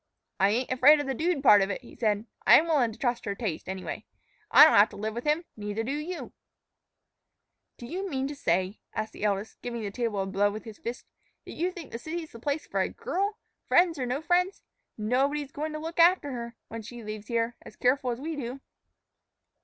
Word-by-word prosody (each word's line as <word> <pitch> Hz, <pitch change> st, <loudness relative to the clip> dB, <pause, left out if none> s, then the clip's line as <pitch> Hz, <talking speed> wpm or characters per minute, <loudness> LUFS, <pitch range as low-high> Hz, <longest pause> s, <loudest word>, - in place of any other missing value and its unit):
"I 195 Hz, -, +5 dB
ain't 245 Hz, +5 st, 0 dB
afraid 275 Hz, +4 st, +6 dB
of 290 Hz, -, -2 dB
the 270 Hz, -, -1 dB
dude 315 Hz, +1 st, 0 dB
part 205 Hz, -6 st, +8 dB
of 195 Hz, -, +1 dB
it," 200 Hz, -, -3 dB
he -, -, -14 dB
said; 215 Hz, -2 st, 0 dB, 0.2 s
"I'm 320 Hz, -, +8 dB
willin' 285 Hz, -8 st, +2 dB
to 215 Hz, -, -12 dB
trust 245 Hz, -2 st, -1 dB
her 200 Hz, -, -2 dB
taste, 195 Hz, -7 st, -4 dB
anyway. 190 Hz, -1 st, -5 dB, 0.5 s
I -, -, +9 dB
don't -, -, +7 dB
have -, -, +6 dB
to -, -, -12 dB
live 215 Hz, +2 st, -3 dB
with 235 Hz, +4 st, -5 dB
him; 305 Hz, +3 st, +1 dB
neither 210 Hz, +1 st, -3 dB
do 250 Hz, -, -3 dB
you." 305 Hz, +5 st, -5 dB, 1.4 s
"Do 240 Hz, -, -9 dB
you 375 Hz, +9 st, -4 dB
mean 270 Hz, -3 st, -1 dB
to 290 Hz, -, -5 dB
say," 185 Hz, -5 st, 0 dB, 0.2 s
asked 215 Hz, 0 st, -3 dB
the -, -, -8 dB
eldest, 205 Hz, 0 st, -1 dB
giving 235 Hz, -2 st, -4 dB
the 200 Hz, -, -3 dB
table 230 Hz, -2 st, -2 dB
a 195 Hz, -, 0 dB
blow 195 Hz, +1 st, +2 dB
with 215 Hz, +1 st, -6 dB
his 220 Hz, -3 st, -11 dB
fist, 235 Hz, +2 st, -6 dB, 0.4 s
"that -, -, -9 dB
you 350 Hz, +3 st, -1 dB
think 350 Hz, -4 st, -10 dB
a 230 Hz, -, -4 dB
city's 320 Hz, +4 st, -5 dB
the 230 Hz, -, -11 dB
place 285 Hz, +5 st, -2 dB
for -, -, -2 dB
a -, -, 0 dB
girl, 400 Hz, +3 st, -2 dB, 0.3 s
friends 345 Hz, -4 st, +4 dB
or 250 Hz, -, -1 dB
no 265 Hz, +5 st, -2 dB
friends? 360 Hz, +3 st, +1 dB, 0.3 s
Nobody's 270 Hz, +6 st, 0 dB
goin' 310 Hz, 0 st, -4 dB
to -, -, -3 dB
look 325 Hz, +2 st, -6 dB
after 335 Hz, -4 st, +5 dB
her, 235 Hz, -1 st, -6 dB
when 230 Hz, 0 st, -6 dB
she 235 Hz, +2 st, -9 dB
leaves 215 Hz, 0 st, -7 dB
here, 235 Hz, 0 st, 0 dB
as -, -, -13 dB
careful 255 Hz, +1 st, +1 dB
as 240 Hz, 0 st, -2 dB
we 315 Hz, +3 st, -4 dB
do." 260 Hz, -1 st, -5 dB
245 Hz, 225 wpm, -28 LUFS, 215-305 Hz, 1.4 s, I